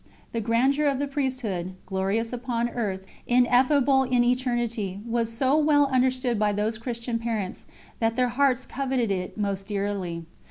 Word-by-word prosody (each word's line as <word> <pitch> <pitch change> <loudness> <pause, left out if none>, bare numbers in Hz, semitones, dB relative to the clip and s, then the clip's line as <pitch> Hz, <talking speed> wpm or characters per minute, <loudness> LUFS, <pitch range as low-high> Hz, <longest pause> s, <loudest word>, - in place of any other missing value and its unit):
The 230 - -2
grandeur 260 +7 +2
of 275 -2 +1
the 285 - -1
Priesthood, 250 -10 -2
glorious 195 +5 -1
upon 240 -1 -1
earth, 200 -6 -3 0.2
ineffable 255 +3 +4
in 250 -2 +2
eternity, 240 -5 -1
was 230 -1 -1
so 260 +4 +1
well 300 -1 +4
understood 255 -2 +1
by 210 -1 +2
those 215 +2 -1
Christian 235 0 -3
parents, 225 -5 -3 0.3
that 225 0 +1
their 250 0 +2
hearts 260 0 +2
coveted 260 -4 -1
it 185 0 -3
most 200 -2 -2
dearly. 195 -5 -3
235 Hz, 150 wpm, -26 LUFS, 210-255 Hz, 0.3 s, ineffable